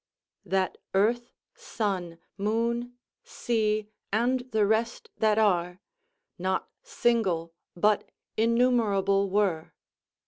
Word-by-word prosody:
"That 190 0 -1 0.2
earth, 240 +5 +2 0.2
sun, 185 -6 -3 0.2
moon, 235 +4 -1 0.3
sea, 215 -2 -1 0.3
and 240 +5 +2
the 220 -3 +2
rest 230 - -1
that 215 -1 +2
are, 180 -4 +2 0.6
Not 185 +1 -1
single, 225 - 0 0.2
but 210 +4 +2 0.3
innumerable 215 -4 +2
were." 185 -5 0
210 Hz, 90 wpm, -27 LUFS, 190-235 Hz, 0.6 s, earth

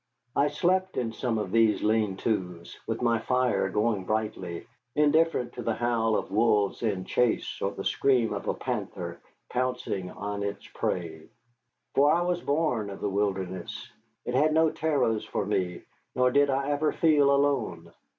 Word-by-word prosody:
I 145 - +4
slept 185 +4 0
in 115 -3 -1
some 115 -1 -1
of 105 -4 -3
these 115 -1 +3
lean 105 -3 +1
tos, 90 -6 -3
with 115 +2 -2
my 115 -1 +3
fire 125 -4 +1
going 105 -1 0
brightly, 105 -5 -3 0.3
indifferent 150 -2 +2
to 125 - -6
the 115 -1 -1
howl 115 -2 +1
of - - -4
wolves 105 -2 +2
in 100 -5 -1
chase 125 -2 0
or 100 - +1
the 95 - -7
scream 125 -2 +2
of - - -5
a - - 0
panther - - -4 0.3
pouncing 125 -7 -2
on 100 +2 -5
its 100 0 -4
prey. 80 -3 -3 0.6
For 145 +2 +5
I 170 +2 +3
was 175 0 -1
born 140 -8 0
of 100 - -8
the 105 - -1
wilderness. 95 -2 -3 0.3
It 125 - -3
had 150 +4 +3
no 160 -1 +4
terrors 135 -9 0
for - - -3
me, 95 -4 -1 0.3
nor 125 0 +3
did 140 +1 +4
I 135 +1 0
ever 150 +1 +1
feel 150 -4 +4
alone. 135 -13 0
115 Hz, 165 wpm, -27 LUFS, 100-140 Hz, 0.6 s, For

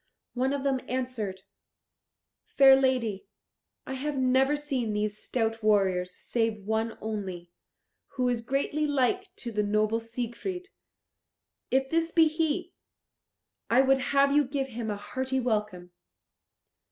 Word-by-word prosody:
One 260 +2 0
of 280 -1 -2
them 270 -2 +1
answered, 235 -7 -3 1.0
"Fair 270 -1 +7
lady, 255 -7 0 0.6
I 265 - -5
have 280 +2 -3
never 260 +2 +3
seen 270 -7 -2
these 210 0 -1
stout 225 -2 -1
warriors, 190 -4 +2
save 225 -4 -2
one 220 +1 -1
only, 190 -5 -5 0.6
who 255 -2 0
is 240 -2 0
greatly 280 +5 -1
like 290 +8 +1
to 240 - -6
the 210 -1 0
noble 215 +2 +1
Siegfried. 245 - -5 1.0
If 265 0 +1
this 330 0 +1
be 325 -2 +5
he, 310 -1 -1 1.0
I 245 +3 +5
would 270 0 +3
have 280 +1 +2
you 295 - +5
give 270 0 -3
him 230 -2 -5
a 205 - -2
hearty 260 +5 -2
welcome. 210 -7 -2
250 Hz, 130 wpm, -28 LUFS, 215-275 Hz, 1.0 s, Fair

